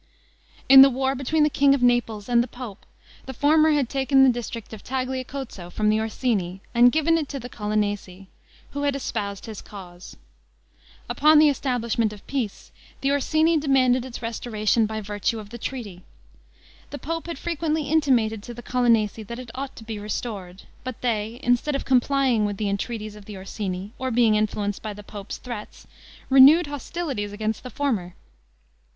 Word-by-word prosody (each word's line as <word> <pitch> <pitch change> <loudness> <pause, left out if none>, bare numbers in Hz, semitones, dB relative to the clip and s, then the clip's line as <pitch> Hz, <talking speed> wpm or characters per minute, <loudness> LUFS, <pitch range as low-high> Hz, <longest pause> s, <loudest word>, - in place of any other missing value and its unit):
In 270 0 +10
the 275 - +9
war 265 +1 0
between 275 +4 +1
the 300 - +4
king 275 0 +4
of 260 - -2
Naples 240 -4 +1
and 240 -1 +4
the 240 - -2
pope, 245 -6 -10 0.4
the 265 - -6
former 310 +4 +4
had 290 -4 +2
taken 270 +1 +3
the 265 - +6
district 235 -2 -6
of 220 - -9
Tagliacozzo 260 -6 -4
from 210 +4 0
the 215 +1 +2
Orsini, 215 -5 -1
and 245 +1 +6
given 315 +3 +2
it 295 - -4
to 275 - -4
the 245 - -7
Colonnesi, 205 -3 -3 0.5
who 285 - -4
had 285 -1 +1
espoused 200 -7 -4
his 220 -3 -8
cause. 180 -3 -11 0.9
Upon 305 +2 +4
the 300 0 +7
establishment 235 -5 0
of 210 -1 -12
peace, 250 -8 -4 0.3
the 275 - +1
Orsini 315 +3 +2
demanded 260 -3 +3
its 250 -2 -8
restoration 225 -1 0
by 220 0 -4
virtue 205 +2 -2
of 210 -1 -9
the 235 - -8
treaty. 220 -8 -6 0.9
The 285 - -6
pope 330 +3 -4
had 335 - -5
frequently 320 -1 -1
intimated 255 -9 +2
to 240 +3 -9
the 240 - -10
Colonnesi 230 -4 +1
that 235 - -6
it 250 -2 -9
ought 270 +1 -6
to 225 - -11
be 220 -1 -6
restored; 205 -3 -5 0.2
but 255 -2 -6
they, 230 -1 -2
instead 245 +4 +1
of 275 - -3
complying 260 -2 +2
with 205 -1 -2
the 210 -1 -1
entreaties 215 +1 -4
of 210 -1 -13
the 210 -1 -8
Orsini, 195 +1 -5
or 260 0 -2
being 235 -2 +3
influenced 210 -1 -1
by 215 -1 -5
the 210 +1 -11
pope's 205 -1 -8
threats, 235 -4 -8 0.5
renewed 280 +6 +8
hostilities 285 -6 -4
against 215 +1 -3
the 255 - -8
former. 220 -10 -2
240 Hz, 175 wpm, -24 LUFS, 210-275 Hz, 0.9 s, In